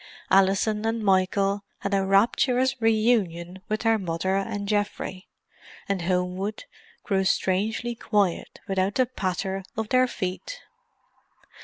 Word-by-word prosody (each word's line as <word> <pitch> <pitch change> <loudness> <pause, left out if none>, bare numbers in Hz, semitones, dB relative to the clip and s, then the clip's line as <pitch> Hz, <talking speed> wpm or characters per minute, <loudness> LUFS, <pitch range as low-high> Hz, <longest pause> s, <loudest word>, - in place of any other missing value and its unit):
Alison 195 +3 +3
and 225 0 -1
Michael 195 +1 +2 0.2
had 200 - -2
a 195 -1 +2
rapturous 245 +6 +3
reunion 210 -6 +1
with 215 0 -1
their 225 -1 +3
mother 185 +1 -1
and 200 +1 -2
Geoffrey, 205 -2 -2 0.6
and 195 -2 -1
Homewood 180 +3 -1 0.4
grew 195 -3 +1
strangely 210 +6 0
quiet 205 -6 -1
without 195 +1 0
the 255 - +3
patter 190 -4 -3 0.2
of 220 -1 -2
their 255 0 +4
feet. 245 - -5
200 Hz, 120 wpm, -25 LUFS, 190-220 Hz, 0.6 s, their